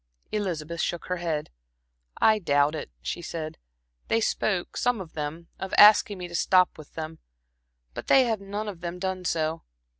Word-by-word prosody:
Elizabeth 170 -6 -2
shook 175 - -2
her 180 - 0
head. 160 - -3 0.7
"I 215 -1 +5
doubt 145 -4 +2
it," 155 - -5
she 175 - -3
said. 160 -2 -6 0.5
"They 225 - +2
spoke 195 -4 -1
some 245 -2 +1
of 175 -4 -8
them 155 +2 -5
of 190 - -3
asking 210 -1 +7
me 180 -1 -6
to 175 - -12
stop 185 +1 +3
with 155 -2 -14
them, 160 0 -6 0.7
but - - -7
they 270 - +6
have 225 -4 -1
none 205 +2 -4
of 190 -5 -7
them 175 +1 -4
done 185 0 -3
so. 160 -1 0
175 Hz, 175 wpm, -26 LUFS, 160-200 Hz, 0.7 s, asking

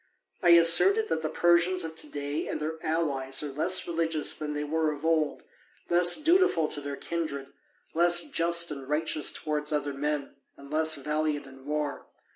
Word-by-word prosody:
I 175 - +3
asserted 175 - +5
that - - -1
the 155 - -3
Persians 175 +2 +2
of 160 0 -6
to 150 - -4
day 145 +1 -4
and - - -4
their 160 +1 -5
allies 140 -4 -1
are 145 - -5
less 170 +7 +1
religious 165 -2 +1
than 150 -1 -5
they 150 0 -3
were 155 +1 -1
of 150 +1 -8
old, 160 -2 0 0.5
less 175 0 +5
dutiful 320 - +2
to 145 - -3
their 140 0 -6
kindred, 140 -4 -5 0.4
less 175 +1 +4
just 170 0 0
and 135 -2 -8
righteous 155 0 0
towards 150 -1 -3
other 145 -1 -2
men, 145 0 -4 0.2
and 140 0 -14
less 160 0 +3
valiant 150 +1 -2
in 135 0 -15
war. 150 -1 -4
155 Hz, 175 wpm, -27 LUFS, 145-170 Hz, 0.5 s, asserted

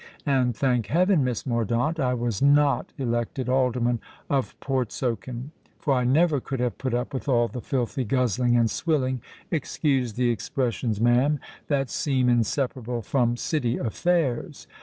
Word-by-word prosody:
And, 130 -4 +2
thank 125 -4 +1
heaven! 175 - +3
Miss 125 -4 -2
Mordaunt, 120 +6 0
I 125 -3 +1
was 120 -4 -2
not 145 0 +3
elected 120 0 -2
Alderman 125 -2 +1 0.3
of 135 -2 -1
Portsoken; 125 0 -3 0.3
for 140 - 0
I 125 -1 +1
never 150 +3 +3
could 135 0 -4
have 125 -1 -1
put 130 -3 -1
up 125 +4 -2
with 135 +1 -4
all 120 -2 +3
the 125 +1 -6
filthy 125 -1 -1
guzzling 125 0 +2
and 115 -1 +4
swilling—excuse 135 -2 -1
the 120 +1 +1
expressions, 115 -1 -2
ma'am—that 135 +2 +1
seem 130 -4 +1
inseparable 120 0 0
from 120 +1 +1
City 125 -4 -1
affairs. 140 +1 -1
125 Hz, 140 wpm, -25 LUFS, 120-140 Hz, 0.3 s, and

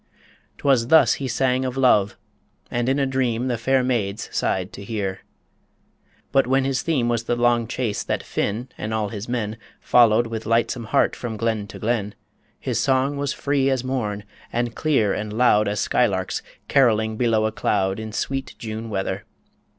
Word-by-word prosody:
'Twas 130 -5 +2
thus 160 +3 +6
he 135 - -1
sang 130 +1 +1
of 130 0 -3
love, 105 -7 +3 0.5
and 120 +1 0
in 135 - +2
a 140 - +2
dream 130 -2 0
The 120 - 0
fair 130 +2 +2
maids 110 -6 -1
sighed 95 -1 -1
to 100 - -8
hear. 100 -3 -3 1.1
But 135 -2 +3
when 135 +1 +2
his 135 -2 0
theme 140 -8 0
Was 120 -1 0
the 120 - 0
long 120 -1 +2
chase 115 -3 -2
that - - -2
Finn 115 +5 -2
and 110 +1 -2
all 105 -2 -1
his 105 +1 -6
men 110 -3 -2 0.2
Followed 120 -1 +4
with 115 -1 -5
lightsome 115 +1 +1
heart - - +2
from 115 -3 -5
glen 110 -2 -1
to - - -10
glen 105 -3 -1 0.4
His - - -2
song 135 +2 +1
was 140 0 -1
free 140 -2 0
as 130 -2 0
morn, 110 -6 -2 0.3
and 120 0 -1
clear 125 -11 +1
and 105 0 -4
loud 110 -2 +3
As 105 +1 -1
skylarks 95 -7 0 0.3
carolling 110 -4 +3
below 110 -2 +2
a 110 - 0
cloud 95 -2 0
In 110 0 -6
sweet 135 +5 -3
June 110 0 -6
weather 95 -2 -2
115 Hz, 175 wpm, -23 LUFS, 110-130 Hz, 1.1 s, thus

